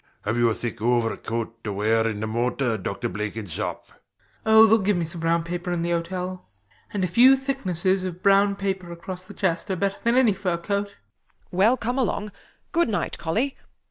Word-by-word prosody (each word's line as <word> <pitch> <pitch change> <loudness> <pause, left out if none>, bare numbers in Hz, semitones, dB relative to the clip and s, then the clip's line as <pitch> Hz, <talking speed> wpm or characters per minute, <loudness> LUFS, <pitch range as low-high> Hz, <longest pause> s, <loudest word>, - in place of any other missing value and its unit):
Have 110 +3 -1
you 120 -1 +3
a 110 - -1
thick 120 -3 -5
overcoat 115 -1 -1
to 105 - -3
wear 110 +3 +1
in 105 -2 -3
the - - -1
motor, 120 +2 0
Dr 100 -1 -3
Blenkinsop? 105 -1 -4
BLENKINSOP. - - -26 0.5
Oh, 220 0 +8
theyll 220 -1 +4
give 200 -1 +2
me 170 - 0
some 170 +1 -3
brown 165 0 +1
paper 175 +1 -4
in 170 -1 -1
the 170 - -1
hotel; 180 +2 -3 0.5
and 200 -2 -1
a - - +2
few 245 +9 +6
thicknesses 195 - 0
of 180 0 -6
brown 200 0 +4
paper 190 -3 -3
across 180 +2 -6
the - - -12
chest 180 0 0
are 190 - 0
better 200 +2 -1
than 235 +1 +2
any 245 -5 +5
fur 185 -3 -1
coat. 200 +3 -3 0.5
WALPOLE. 180 - -7
Well, 225 +6 +5
come 245 +3 -2
along. 210 -3 -1 0.4
Good 340 -6 +2
night, 200 -6 -2
Colly. 230 +12 -1
180 Hz, 200 wpm, -24 LUFS, 120-200 Hz, 0.5 s, Oh